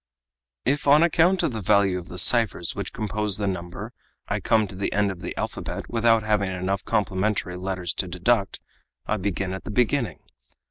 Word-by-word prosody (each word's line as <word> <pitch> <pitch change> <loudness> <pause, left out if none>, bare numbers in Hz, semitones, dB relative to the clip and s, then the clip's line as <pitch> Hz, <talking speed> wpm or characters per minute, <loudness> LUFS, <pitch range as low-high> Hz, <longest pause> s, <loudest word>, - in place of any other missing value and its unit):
"If, 145 +2 0
on 145 +3 +7
account 175 +2 +3
of - - +1
the 110 -2 -4
value 95 -1 +3
of 85 - -11
the 90 - -9
ciphers 100 -3 +4
which - - -5
compose 105 -2 -1
the 105 - -2
number 90 -2 -5 0.3
I - - -1
come 110 -1 +2
to 95 - -10
the 95 - -2
end 100 -1 +1
of 90 -2 -9
the - - -6
alphabet - - -4
without 115 -1 +3
having 105 -2 +1
enough 95 +1 -2
complementary 100 -3 -1
letters 90 -1 -3
to 95 - 0
deduct, 100 +4 0 0.5
I 105 - 0
begin 95 -1 -2
again - - -4
at - - -14
the - - -8
beginning. 115 - +1
100 Hz, 190 wpm, -24 LUFS, 95-115 Hz, 0.5 s, on